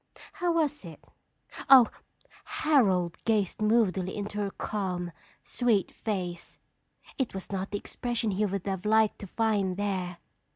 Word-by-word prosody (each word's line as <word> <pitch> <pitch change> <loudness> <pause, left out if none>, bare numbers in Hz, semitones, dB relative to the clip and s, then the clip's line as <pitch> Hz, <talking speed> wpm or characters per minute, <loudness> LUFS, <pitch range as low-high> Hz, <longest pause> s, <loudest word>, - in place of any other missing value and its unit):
How 355 -4 0
was 300 -5 0
it? 165 -4 -10 0.7
Oh! 260 -4 +9 0.6
"Harold 250 - +2
gazed 215 -3 0
moodily 210 -4 +2
into 205 0 -4
her 200 -1 -1
calm, 185 -4 -3 0.3
sweet 230 -6 +1
face. 180 -5 -4 0.6
It 255 -7 -1
was 190 - -7
not 195 0 -3
the 205 - -2
expression 235 +1 -2
he 200 +2 +1
would 195 -1 -3
have 190 -2 -3
liked 220 0 +3
to 200 - -7
find 200 -3 0
there. 185 -3 -2
205 Hz, 135 wpm, -28 LUFS, 185-230 Hz, 0.7 s, Oh